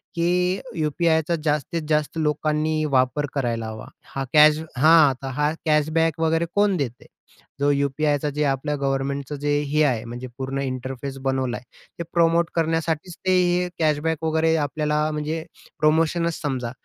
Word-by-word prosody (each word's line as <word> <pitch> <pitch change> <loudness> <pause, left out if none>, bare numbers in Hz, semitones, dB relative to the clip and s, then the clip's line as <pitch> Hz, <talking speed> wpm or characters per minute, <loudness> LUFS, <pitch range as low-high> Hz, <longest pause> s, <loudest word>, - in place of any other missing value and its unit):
की 180 +2 +1 0.2
यू-पी-आयचा 160 +1 +1
जास्तीत-जास्त 150 0 -1
लोकांनी 155 0 0
वापर 130 +2 +2
करायला 115 -5 -2
हवा. 110 0 -7 0.3
हा 135 - -1
कॅश 150 0 +7 0.2
हां, 155 0 +6
तर 135 - -5
हा 150 +1 +2
कॅशबॅक 155 +1 +2
वगैरे 165 +1 +1
कोण 205 -2 +3
देते? 125 -5 -4 0.5
जो 145 0 +2
यू-पी-आयचा 145 +1 0
जे 150 - +1
आपल्या 140 +2 -1
गव्हर्नमेंटचं 140 +1 -2
जे 145 +1 -1 0.2
हे 150 +1 +3
आहे 125 -6 +1
म्हणजे 120 +2 -7
पूर्ण 135 +1 -3
इंटरफेस 130 +1 -5
बनवलाय, 130 -2 -1 0.4
ते - - -2
प्रमोट 170 0 +3
करण्यासाठीच 165 +1 -1
ते 185 - +3
हे 180 0 +1
कॅशबॅक 155 0 0
वगैरे 160 0 +2
आपल्याला 150 0 0
म्हणजे 155 +1 -3 0.4
प्रोमोशनच 165 +2 +2
समजा. 130 -5 -2
150 Hz, 140 wpm, -23 LUFS, 140-160 Hz, 0.5 s, कॅश